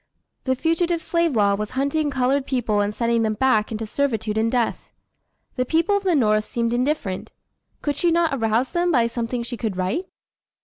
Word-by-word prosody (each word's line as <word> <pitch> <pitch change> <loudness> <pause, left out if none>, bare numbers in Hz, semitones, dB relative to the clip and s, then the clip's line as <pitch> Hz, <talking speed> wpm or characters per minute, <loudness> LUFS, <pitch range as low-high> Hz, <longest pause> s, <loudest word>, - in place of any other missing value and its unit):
The 260 -1 +1
Fugitive 335 +4 0
Slave 335 -3 0
Law 200 -2 +3
was 210 +1 -2
hunting 290 +2 +1
colored 265 +1 0
people 230 -6 0
and 205 0 0
sending 235 +1 0
them 215 -1 0
back 220 -3 +2
into 220 0 -3
servitude 220 -3 -1
and 225 +1 +1
death. 245 -3 -1 0.7
The 255 - +2
people 330 +9 +1
of 405 - +1
the 365 -3 +2
North 215 -5 +2
seemed 235 -1 -1
indifferent. 245 -7 -1 0.5
Could 290 -1 0
she 345 - +1
not 335 -2 +2
arouse 230 0 0
them 350 0 +1
by 240 -6 +3
something 235 +1 -3
she 240 0 -6
could 215 -6 -3
write? 190 - -1
245 Hz, 185 wpm, -23 LUFS, 220-300 Hz, 0.7 s, Law